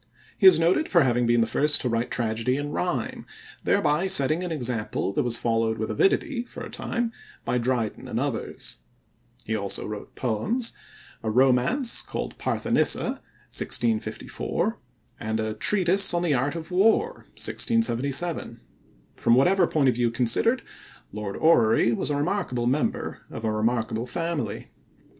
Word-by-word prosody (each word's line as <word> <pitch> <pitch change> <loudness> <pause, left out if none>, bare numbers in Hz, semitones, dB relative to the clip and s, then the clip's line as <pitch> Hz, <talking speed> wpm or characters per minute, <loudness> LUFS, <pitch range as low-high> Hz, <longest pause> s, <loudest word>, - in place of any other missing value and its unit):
He 195 - +6
is 175 -4 +8
noted 175 - +2
for 170 -4 +5
having 120 -2 +1
been 120 0 +3
the - - +3
first 150 +6 +3
to - - -1
write 115 0 -1
tragedy 115 +2 -1
in 145 0 -4
rhyme, 160 -8 -2 0.4
thereby 150 +6 +2
setting 155 -1 +3
an 180 - -4
example 120 -8 -2
that - - +1
was 120 -1 0
followed 115 -1 0
with 110 0 -3
avidity 235 - +1
for - - -9
a - - -8
time 235 -1 -2 0.3
by 125 - 0
Dryden 120 -3 -2
and - - -2
others. - - -4 0.7
He 110 - -1
also 100 -2 -3
wrote 105 -1 -7
poems, 205 - -1 0.5
a 110 - -2
romance 130 - +2
called - - -6
Parthenissa - - 0 0.3
(1654), 115 -2 -1 0.4
and 110 0 -2
a 110 0 -2
Treatise 185 - +2
on 175 - 0
the 165 -4 +2
Art 140 +4 0
of 165 +2 -6
War 225 - +2
(1677). 140 - -1 0.6
From 115 - +3
whatever 180 +7 +4
point 145 -4 +1
of - - +2
view 120 0 +1
considered, 125 - +1 0.5
Lord 105 -1 -5
Orrery 120 -8 +4
was 115 - -1
a 145 - 0
remarkable 145 -6 -1
member 135 +5 -1
of 115 - -6
a 110 - +1
remarkable 110 +1 -1
family. 155 -6 -3
125 Hz, 150 wpm, -25 LUFS, 115-175 Hz, 0.7 s, is